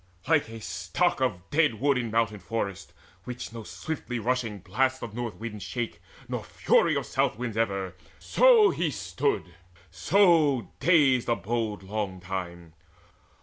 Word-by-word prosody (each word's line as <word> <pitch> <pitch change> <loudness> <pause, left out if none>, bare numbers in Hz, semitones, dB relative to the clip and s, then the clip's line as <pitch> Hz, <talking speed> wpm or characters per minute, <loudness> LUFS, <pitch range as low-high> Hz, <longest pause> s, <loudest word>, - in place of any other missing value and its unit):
Like 150 -6 +3
a 115 0 -8
stock - - -1
Of 90 +1 -1
dead 150 -5 +3
wood 140 +2 +3
in 125 -2 -1
a - - -6
mountain 110 -2 0
forest, 100 +1 -4 0.3
which 125 -1 -6
No 115 - -6
swiftly 125 +2 -5
rushing 115 -2 -1
blasts 130 +8 -1
of 115 - -6
north 120 -1 -4
winds 110 -3 -7
shake, 120 -2 -4 0.3
Nor - - -4
fury - - +2
of - - -1
south - - 0
winds 120 -3 -4
ever, 100 -4 -1 0.2
so 465 -5 +5
he 170 -2 -1
stood, 90 - -2 0.4
So 150 - +3
dazed 145 -8 +4
abode 110 -1 -1
long 100 -1 -3
time. 85 -3 -6
115 Hz, 145 wpm, -27 LUFS, 100-130 Hz, 0.4 s, so